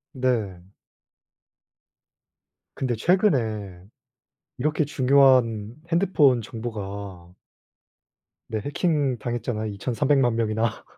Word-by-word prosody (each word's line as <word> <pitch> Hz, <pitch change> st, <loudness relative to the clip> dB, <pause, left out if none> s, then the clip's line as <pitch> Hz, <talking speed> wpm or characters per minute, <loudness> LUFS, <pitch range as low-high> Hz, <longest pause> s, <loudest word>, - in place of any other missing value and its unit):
네. 100 Hz, -8 st, -2 dB, 2.0 s
근데 125 Hz, -3 st, -1 dB
최근에 110 Hz, -, 0 dB, 0.8 s
이렇게 150 Hz, +3 st, 0 dB
중요한 130 Hz, -6 st, +3 dB, 0.2 s
핸드폰 155 Hz, -9 st, +3 dB
정보가 100 Hz, -5 st, -7 dB, 1.1 s
네 110 Hz, -, -3 dB
해킹 145 Hz, -, 0 dB
당했잖아요 120 Hz, -2 st, -3 dB
23,000,000 125 Hz, +3 st, +1 dB
명이나. 110 Hz, 0 st, -1 dB
120 Hz, 160 characters per minute, -24 LUFS, 105-135 Hz, 2.0 s, 중요한